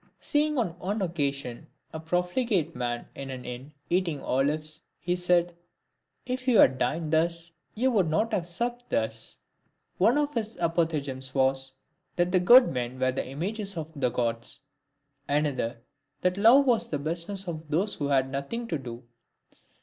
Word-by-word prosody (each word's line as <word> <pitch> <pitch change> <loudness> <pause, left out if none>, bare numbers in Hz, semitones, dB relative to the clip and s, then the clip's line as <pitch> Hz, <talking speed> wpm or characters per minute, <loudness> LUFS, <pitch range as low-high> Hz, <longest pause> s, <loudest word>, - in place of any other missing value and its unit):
Seeing 300 0 +1
on 180 -8 -1
one 200 +4 -2
occasion 140 -8 -3 0.3
a 160 - -4
profligate 180 - 0
man 120 -1 -3
in 135 -1 -7
an 130 -1 -7
inn 125 +4 -7 0.2
eating 175 -4 0
olives, 150 +4 -1 0.2
he 175 +1 -1
said, 175 -1 +2 0.4
" - - -50
If 255 0 -5
you 245 -4 +5
had 130 0 +6
dined 155 +5 -1
thus, 170 +1 +1 0.2
you 255 +4 +2
would 195 -8 +2
not 215 +8 +1
have 180 -5 0
supped 240 +7 -2
thus." 110 0 -1 0.6
One 225 +9 +4
of 295 0 0
his 220 -2 -3
apophthegms 150 -6 -1
was, 135 0 +2 0.4
that 175 0 +1
good 245 +4 +8
men 125 0 -3
were 130 0 +2
the 130 - -3
images 195 - -4
of 160 0 -5
the 130 -3 +1
Gods; 115 0 -2 0.7
another, 140 -5 0 0.4
that 180 0 +2
love 235 +8 +6
was 235 -2 +2
the 150 - -1
business 170 +6 -4
of 160 -2 -6
those 185 +7 +1
who 145 - -3
had 135 -2 +3
nothing 140 - -4
to 160 - -1
do. 120 -1 -8
165 Hz, 160 wpm, -27 LUFS, 135-200 Hz, 0.7 s, good